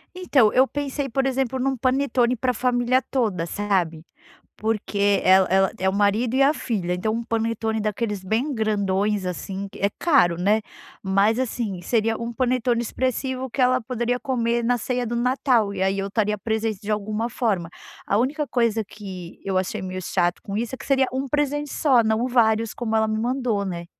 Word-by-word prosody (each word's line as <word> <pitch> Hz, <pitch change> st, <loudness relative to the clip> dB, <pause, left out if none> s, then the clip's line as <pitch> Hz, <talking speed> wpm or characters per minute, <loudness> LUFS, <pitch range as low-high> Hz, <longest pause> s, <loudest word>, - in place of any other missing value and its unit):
Então 280 Hz, -12 st, +3 dB
eu 260 Hz, +1 st, +4 dB
pensei, 285 Hz, -1 st, -3 dB
por 270 Hz, +3 st, 0 dB
exemplo, 265 Hz, -1 st, 0 dB
num 265 Hz, +1 st, 0 dB
panetone 255 Hz, -1 st, +1 dB
para 250 Hz, +2 st, 0 dB
a -, -, -6 dB
família 245 Hz, +1 st, +1 dB
toda, 215 Hz, -11 st, -1 dB
sabe? 175 Hz, -4 st, -1 dB, 0.5 s
Porque 205 Hz, -2 st, 0 dB
ela 190 Hz, 0 st, +5 dB
ela 190 Hz, 0 st, +3 dB
é 190 Hz, -, +2 dB
o 190 Hz, -, -2 dB
marido 210 Hz, +4 st, +1 dB
e 270 Hz, -, +3 dB
a 285 Hz, -, +4 dB
filha. 200 Hz, -, -2 dB
Então, 205 Hz, +5 st, -1 dB
um 230 Hz, +1 st, -2 dB
panetone 225 Hz, -1 st, -1 dB
daqueles 210 Hz, -2 st, -2 dB
bem 230 Hz, +10 st, -1 dB
grandões, 205 Hz, -3 st, 0 dB
assim, 190 Hz, +2 st, -4 dB
que -, -, -12 dB
é 200 Hz, -, +2 dB
caro, 245 Hz, -, +4 dB
né, 210 Hz, +4 st, +2 dB, 0.4 s
Mas, 200 Hz, +4 st, +2 dB
assim, 220 Hz, -7 st, -3 dB
seria 225 Hz, +3 st, +1 dB
um 235 Hz, 0 st, -4 dB
panetone 245 Hz, -1 st, +1 dB
expressivo 260 Hz, +2 st, -2 dB
que 270 Hz, -, -8 dB
ela 255 Hz, 0 st, +3 dB
poderia 245 Hz, +1 st, -2 dB
comer 235 Hz, -3 st, 0 dB
na 245 Hz, +1 st, +2 dB
ceia 245 Hz, +1 st, -2 dB
do 235 Hz, -, -3 dB
Natal. 240 Hz, -3 st, +1 dB
E 190 Hz, -, -4 dB
aí 190 Hz, +1 st, +1 dB
eu 195 Hz, -, -2 dB
estaria 210 Hz, 0 st, 0 dB
presente 220 Hz, 0 st, -2 dB
de 210 Hz, -, -4 dB
alguma 215 Hz, +2 st, -1 dB
forma. 205 Hz, -9 st, -1 dB, 0.4 s
A 200 Hz, -, +2 dB
única 290 Hz, +5 st, 0 dB
coisa 230 Hz, -3 st, +1 dB
que 185 Hz, -4 st, -9 dB
eu 190 Hz, -1 st, 0 dB
achei 185 Hz, 0 st, -2 dB
meio 185 Hz, 0 st, -5 dB
chato 175 Hz, -1 st, 0 dB
com 200 Hz, -, -5 dB
isso, 235 Hz, +3 st, -3 dB
é -, -, -16 dB
que -, -, -10 dB
seria 270 Hz, -1 st, +3 dB
um 265 Hz, +1 st, -2 dB
presente 290 Hz, 0 st, -1 dB
só, 260 Hz, -6 st, +3 dB
não 220 Hz, +2 st, +1 dB
vários, 225 Hz, -3 st, +2 dB
como 225 Hz, -2 st, -2 dB
ela 220 Hz, 0 st, +3 dB
me 215 Hz, 0 st, -1 dB
mandou, 240 Hz, -4 st, -1 dB
né. 175 Hz, -2 st, -5 dB
225 Hz, 195 wpm, -23 LUFS, 200-255 Hz, 0.5 s, ela